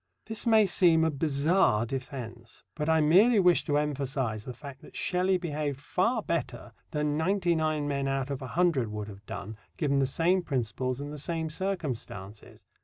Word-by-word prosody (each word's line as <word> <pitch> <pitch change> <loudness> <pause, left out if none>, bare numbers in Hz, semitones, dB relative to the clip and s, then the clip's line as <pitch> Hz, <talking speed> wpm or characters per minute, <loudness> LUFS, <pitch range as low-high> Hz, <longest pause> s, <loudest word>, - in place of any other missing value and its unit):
This 225 +1 -4
may 220 -2 +6
seem 170 -4 +4
a 160 - +2
bizarre 145 - +2
defence, 120 -2 -7
but 150 0 -2
I 160 0 +4
merely 200 +9 +5
wish 180 -2 +4
to 145 -3 +1
emphasize 135 -7 -2
the 125 - -6
fact 140 0 -10
that - - -15
Shelley 185 +1 +1
behaved 150 -5 -3
far 210 - 0
better 170 - -3 0.2
than 150 -1 -1
ninety 175 +1 +1
nine 155 -2 0
men 140 -1 -1
out 135 0 -1
of 140 - -4
a 130 - -5
hundred 165 -10 +3
would 105 -1 -5
have 100 0 -13
done, 110 +2 -6 0.2
given 140 -4 +1
the 135 - +2
same 175 +7 +2
principles 130 - -2
and 145 +1 -6
the 150 - -6
same 160 +1 -2
circumstances. 130 - -5
150 Hz, 180 wpm, -29 LUFS, 130-175 Hz, 0.2 s, may